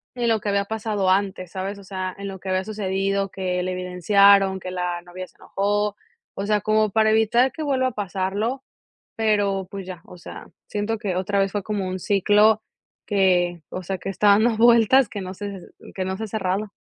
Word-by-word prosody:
en 240 Hz, -2 st, 0 dB
lo 225 Hz, -, +2 dB
que 205 Hz, -, -3 dB
había 200 Hz, 0 st, +1 dB
pasado 210 Hz, -3 st, -1 dB
antes, 190 Hz, -2 st, 0 dB
¿sabes? 195 Hz, +2 st, -4 dB
O -, -, -13 dB
sea, 185 Hz, -1 st, -5 dB
en 200 Hz, -, -6 dB
lo 190 Hz, -, -8 dB
que 190 Hz, -, -7 dB
había 185 Hz, 0 st, 0 dB
sucedido, 195 Hz, -1 st, -1 dB
que 180 Hz, -1 st, -2 dB
le 185 Hz, 0 st, -2 dB
evidenciaron, 190 Hz, +2 st, +4 dB
que 185 Hz, 0 st, -7 dB
la 180 Hz, -1 st, -3 dB
novia 180 Hz, +1 st, -9 dB
se -, -, -27 dB
enojó. 205 Hz, +1 st, -1 dB, 0.4 s
O 195 Hz, -, -3 dB
sea, 210 Hz, -1 st, +1 dB
como 215 Hz, -1 st, +2 dB
para 220 Hz, 0 st, +3 dB
evitar 235 Hz, +4 st, +3 dB
que 315 Hz, -, -6 dB
vuelva 265 Hz, -3 st, +1 dB
a -, -, -2 dB
pasarlo. 205 Hz, +5 st, -2 dB, 0.5 s
Pero 205 Hz, -4 st, +1 dB
pues 195 Hz, -2 st, -6 dB
ya, 180 Hz, -2 st, -8 dB
o 180 Hz, -, -13 dB
sea, 170 Hz, -, -10 dB, 0.2 s
siento 210 Hz, +2 st, -2 dB
que 195 Hz, -4 st, -2 dB
otra 195 Hz, +2 st, 0 dB
vez 195 Hz, 0 st, +1 dB
fue 205 Hz, 0 st, -3 dB
como 200 Hz, -2 st, -3 dB
un 185 Hz, 0 st, -4 dB
ciclo 210 Hz, +3 st, +3 dB, 0.4 s
que, 180 Hz, -4 st, +2 dB
o 185 Hz, -, -6 dB
sea, 190 Hz, +2 st, -3 dB
que 195 Hz, -, -5 dB
está 205 Hz, +2 st, +1 dB
dando 220 Hz, +3 st, +4 dB
vueltas 235 Hz, +1 st, +5 dB
que 205 Hz, -, -6 dB
no 185 Hz, 0 st, -6 dB
se 200 Hz, -1 st, -6 dB, 0.4 s
que 185 Hz, -1 st, -2 dB
no 190 Hz, -, -2 dB
se 220 Hz, -, -5 dB
ha -, -, -8 dB
cerrado. 200 Hz, 0 st, -2 dB
200 Hz, 210 wpm, -23 LUFS, 185-215 Hz, 0.5 s, vueltas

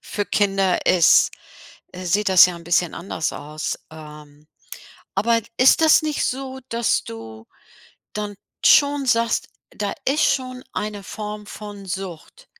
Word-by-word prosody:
für 205 Hz, -, -4 dB
Kinder 195 Hz, -3 st, +1 dB
ist 175 Hz, -3 st, +5 dB, 0.6 s
äh, 185 Hz, +1 st, -8 dB
sieht 200 Hz, +4 st, +1 dB
das 185 Hz, -2 st, +8 dB
ja 180 Hz, -, -5 dB
'n 170 Hz, -, -13 dB
bisschen 175 Hz, 0 st, +1 dB
anders 170 Hz, -2 st, -3 dB
aus, 150 Hz, +1 st, -5 dB
ähm. 150 Hz, -1 st, -13 dB, 0.7 s
Aber 230 Hz, +4 st, +2 dB, 0.2 s
ist 255 Hz, +4 st, +6 dB
das 315 Hz, -, +6 dB
nicht 305 Hz, -2 st, -2 dB
so, 265 Hz, 0 st, -4 dB
dass 235 Hz, 0 st, +1 dB
du 110 Hz, -1 st, -10 dB, 0.7 s
dann 210 Hz, -1 st, -4 dB, 0.3 s
schon 285 Hz, -1 st, +5 dB
sagst, 230 Hz, -2 st, +1 dB, 0.2 s
da 205 Hz, -1 st, -4 dB
ist 285 Hz, +4 st, +2 dB
schon 255 Hz, -1 st, -1 dB
eine 210 Hz, -1 st, -4 dB
Form 210 Hz, +1 st, -7 dB
von 205 Hz, -1 st, -9 dB
Sucht 190 Hz, -, -7 dB
205 Hz, 140 wpm, -22 LUFS, 170-235 Hz, 0.7 s, das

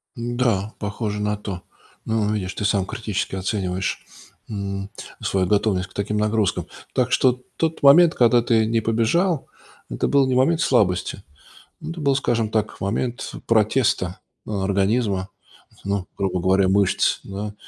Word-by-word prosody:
Да, 120 Hz, -4 st, -1 dB
похоже 105 Hz, 0 st, -3 dB
на 105 Hz, 0 st, -1 dB
то. 100 Hz, -4 st, -6 dB, 0.4 s
Ну, 110 Hz, -1 st, 0 dB
видишь, 95 Hz, -3 st, -3 dB
ты -, -, -5 dB
сам 100 Hz, -2 st, +2 dB
критически 105 Hz, -1 st, -3 dB
оцениваешь, 95 Hz, -1 st, -2 dB, 0.4 s
м, 100 Hz, -2 st, -4 dB, 0.3 s
свою 95 Hz, -1 st, 0 dB
готовность 100 Hz, -1 st, +1 dB
к -, -, -20 dB
таким 105 Hz, +1 st, -2 dB
нагрузкам. 105 Hz, -1 st, 0 dB, 0.3 s
Так 125 Hz, -1 st, +1 dB
что 125 Hz, -1 st, +3 dB, 0.2 s
тот 160 Hz, -2 st, -1 dB
момент, 160 Hz, +4 st, +7 dB
когда 120 Hz, 0 st, +4 dB
ты 115 Hz, -1 st, +2 dB
не 115 Hz, +1 st, +1 dB
побежал, 115 Hz, -, +1 dB, 0.4 s
это -, -, -1 dB
был 140 Hz, -1 st, +3 dB
не 130 Hz, -, +1 dB
момент 160 Hz, +6 st, +3 dB
слабости, 100 Hz, -, +1 dB, 0.6 s
это 165 Hz, +1 st, -6 dB
был, 140 Hz, -3 st, +2 dB
скажем 115 Hz, -4 st, 0 dB
так, 110 Hz, 0 st, -2 dB
момент 120 Hz, +5 st, -3 dB
протеста 110 Hz, -4 st, +1 dB, 0.3 s
организма, 100 Hz, 0 st, 0 dB, 0.6 s
ну, 100 Hz, -2 st, -2 dB
грубо 95 Hz, -2 st, -1 dB
говоря, 95 Hz, +1 st, +3 dB
мышц, 100 Hz, 0 st, +2 dB
да, 105 Hz, +2 st, -6 dB
105 Hz, 140 wpm, -22 LUFS, 100-120 Hz, 0.6 s, момент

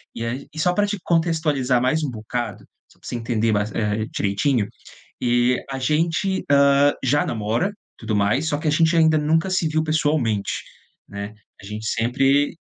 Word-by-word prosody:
E 115 Hz, 0 st, -4 dB
aí 130 Hz, +5 st, -4 dB
e 155 Hz, -, -7 dB
só 180 Hz, +3 st, +2 dB
pra 205 Hz, +2 st, +1 dB
te 205 Hz, 0 st, -2 dB
contextualizar 160 Hz, -7 st, +1 dB
mais 155 Hz, +5 st, +1 dB
um 140 Hz, -, -1 dB
bocado, 110 Hz, -1 st, -5 dB, 0.3 s
só -, -, -24 dB
pra -, -, -13 dB
você -, -, -4 dB
entender 115 Hz, -1 st, 0 dB
mais, 105 Hz, 0 st, 0 dB
eh, 105 Hz, 0 st, -1 dB
direitinho, 100 Hz, +3 st, 0 dB, 0.5 s
e 120 Hz, +1 st, +2 dB
a 135 Hz, -, -3 dB
gente, 165 Hz, +7 st, 0 dB
hã, 140 Hz, 0 st, +5 dB
já 145 Hz, +3 st, +2 dB
namora, 115 Hz, -, -1 dB, 0.2 s
tudo 110 Hz, -2 st, -3 dB
mais, 105 Hz, +10 st, +1 dB
só 145 Hz, -, 0 dB
que 155 Hz, -, -2 dB
a -, -, +4 dB
gente 160 Hz, +2 st, +3 dB
ainda 160 Hz, -1 st, +4 dB
nunca 160 Hz, +4 st, +1 dB
se 185 Hz, -3 st, +1 dB
viu 155 Hz, 0 st, +1 dB
pessoalmente, 145 Hz, -9 st, 0 dB, 0.6 s
né. 100 Hz, +1 st, -6 dB, 0.3 s
A -, -, -14 dB
gente 105 Hz, +2 st, -6 dB
sempre 135 Hz, +7 st, +1 dB
135 Hz, 180 wpm, -22 LUFS, 115-155 Hz, 0.6 s, hã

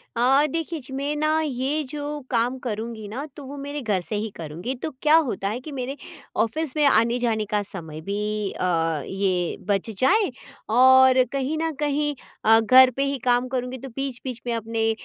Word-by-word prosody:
अ, 265 Hz, +5 st, +4 dB
देखिए 330 Hz, +1 st, -3 dB
जी 265 Hz, +1 st, -11 dB
मैं 280 Hz, +2 st, -2 dB
ना 310 Hz, +1 st, +1 dB
ये 285 Hz, +1 st, -1 dB
जो 295 Hz, 0 st, -4 dB
काम 245 Hz, +2 st, +1 dB
करूँगी 220 Hz, -2 st, -5 dB
ना, 250 Hz, +8 st, -5 dB
तो 290 Hz, -, -9 dB
वो 285 Hz, +2 st, -8 dB
मेरे 285 Hz, +1 st, -5 dB
घर 210 Hz, -5 st, 0 dB
से 210 Hz, -, -3 dB
ही 215 Hz, +2 st, -2 dB
करूँगी। 170 Hz, -, -5 dB
तो 285 Hz, +5 st, -4 dB
क्या 305 Hz, +1 st, +5 dB
होता 240 Hz, -11 st, +1 dB
है 230 Hz, +4 st, -3 dB
कि 295 Hz, +3 st, -9 dB
मेरे 270 Hz, +1 st, -4 dB, 0.5 s
ऑफ़िस 300 Hz, +5 st, -2 dB
में 300 Hz, -, +3 dB
आने-जाने 230 Hz, -3 st, +2 dB
का 210 Hz, -1 st, +2 dB
समय 160 Hz, -6 st, -6 dB
भी 210 Hz, +2 st, -2 dB
अ, 165 Hz, -4 st, 0 dB
ये 185 Hz, -3 st, -1 dB
बच 200 Hz, +1 st, 0 dB
जाए 390 Hz, +3 st, +3 dB, 0.4 s
और 260 Hz, +2 st, +6 dB
कहीं 275 Hz, +3 st, -1 dB
न 325 Hz, 0 st, 0 dB
कहीं 295 Hz, 0 st, 0 dB, 0.3 s
अ, 225 Hz, +1 st, +7 dB
घर 255 Hz, +3 st, +7 dB
पे 275 Hz, +3 st, -1 dB
ही 275 Hz, 0 st, -1 dB
काम 245 Hz, +1 st, +3 dB
करूँगी 255 Hz, 0 st, -3 dB
तो 270 Hz, +2 st, -9 dB
बीच-बीच 260 Hz, -3 st, -5 dB
में 240 Hz, -, 0 dB
अपने 225 Hz, 0 st, 0 dB
250 Hz, 185 wpm, -24 LUFS, 215-280 Hz, 0.5 s, अ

